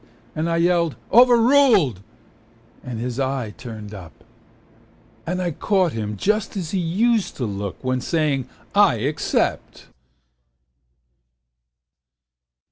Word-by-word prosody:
And 160 +2 -1
I 165 - 0
yelled 170 -2 +2 0.2
"overruled" 235 - +5 0.8
and 120 -3 -6
his 125 +2 -4
eye 130 -5 -2
turned 110 -4 -9
up. 90 -6 -12 1.0
And 180 +2 -2
I 180 -2 -1
caught 185 +2 +1
him 105 -2 -4
just 210 - -1
as 170 -5 -4
he 195 - 0
used 210 +6 0
to 125 - -2
look 100 -2 -5
When 130 0 -1
saying 145 -3 -1 0.2
"I 200 -10 +5
except." 140 +7 -2
155 Hz, 110 wpm, -22 LUFS, 120-195 Hz, 1.0 s, overruled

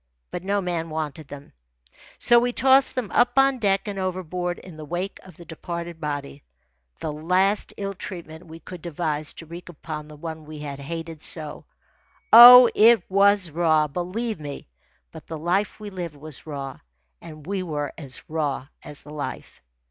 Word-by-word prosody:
But 180 - -5
no 200 +1 0
man 170 -3 -3
wanted 155 -1 -5
them, 145 0 -11 0.6
so 240 0 +6
we 245 +1 -1
tossed 265 +2 +4
them 250 -6 -3
up 245 +1 +2
on 270 -1 +4
deck 195 -2 +1
and 200 -1 -4
overboard 180 -1 -3
in 180 -3 -12
the 155 - -9
wake 175 +6 -4
of 185 -4 -16
the 170 - -12
departed 170 0 -7
body 145 -1 -5 0.6
the 150 - -4
last 185 +6 +1
ill 200 0 -4
treatment 170 -3 -9
we 160 +1 -11
could 180 0 -10
devise 155 -2 -3
to 165 - -10
wreak 170 +3 -10
upon 155 -2 -7
the 155 - -12
one 160 0 -8
we 155 0 -9
had 145 -2 -7
hated 165 +2 -7
so. 155 -3 -4 0.7
Oh, 245 +1 +12
it 225 -2 +6
was 200 -3 +4
raw, 155 -1 +2
believe 180 +7 -4
me; 145 -2 -8 0.4
but - - -12
the 160 - -5
life 180 +8 -1
we 210 -1 -8
lived 175 -5 -6
was 155 +1 -9
raw, 140 -3 -6 0.4
and 155 -3 -12
we 195 +1 -2
were 150 -5 -4
as 140 -5 -9
raw 145 -4 -3
as 145 - -10
the 150 - -11
life. 150 - -7
170 Hz, 175 wpm, -24 LUFS, 150-195 Hz, 0.7 s, Oh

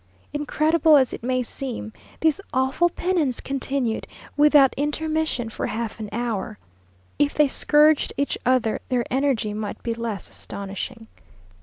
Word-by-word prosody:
Incredible 305 +1 +3
as 260 -2 +2
it - - -6
may 255 +1 0
seem, 235 -3 -6 0.3
this 320 +3 +2
awful 265 +7 +2
penance 340 -8 0
continued, 270 -4 -2 0.3
without 290 -2 +6
intermission, 310 -3 -1
for - - -3
half 225 -1 -4
an 215 -1 -5
hour! 225 -2 -3 0.6
If 290 0 +2
they 300 -1 +5
scourged 300 +2 +3
each 280 +1 0
other, 245 -3 +1
their 245 -2 +1
energy 260 -6 +1
might 210 -1 -5
be 230 - -1
less 230 -3 -4
astonishing. 200 +4 -6
260 Hz, 135 wpm, -23 LUFS, 230-295 Hz, 0.6 s, without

